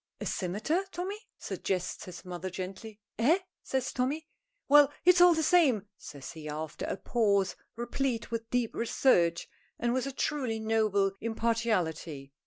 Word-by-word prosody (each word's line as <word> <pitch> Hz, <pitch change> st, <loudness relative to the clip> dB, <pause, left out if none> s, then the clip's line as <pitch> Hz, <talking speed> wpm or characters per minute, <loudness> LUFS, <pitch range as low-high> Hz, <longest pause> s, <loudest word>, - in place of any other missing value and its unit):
"A -, -, -5 dB
cimeter, 215 Hz, -, -1 dB
Tommy?" 395 Hz, +5 st, -5 dB
suggests 185 Hz, -2 st, -3 dB
his 180 Hz, 0 st, -10 dB
mother, 180 Hz, +1 st, -5 dB
gently. 190 Hz, +4 st, -7 dB, 0.2 s
"Eh?" 290 Hz, +10 st, +5 dB, 0.2 s
says 265 Hz, -1 st, -2 dB
Tommy. 275 Hz, +5 st, -1 dB, 0.4 s
"Well, 290 Hz, 0 st, +7 dB
it's 360 Hz, 0 st, +7 dB
all 355 Hz, -1 st, +8 dB
the 320 Hz, -, +1 dB
same," 265 Hz, -, +4 dB
says 140 Hz, -8 st, -9 dB
he, 155 Hz, -2 st, -8 dB
after 155 Hz, +1 st, -4 dB
a -, -, -2 dB
pause, 200 Hz, -5 st, +1 dB, 0.2 s
replete 240 Hz, 0 st, -2 dB
with 230 Hz, 0 st, -3 dB
deep 245 Hz, -2 st, 0 dB
research 175 Hz, -8 st, +2 dB, 0.3 s
and 240 Hz, 0 st, 0 dB
with 260 Hz, +1 st, 0 dB
a -, -, -3 dB
truly 260 Hz, -4 st, -1 dB
noble 215 Hz, -3 st, +2 dB
impartiality. 200 Hz, -11 st, -1 dB
225 Hz, 145 wpm, -30 LUFS, 185-265 Hz, 0.4 s, all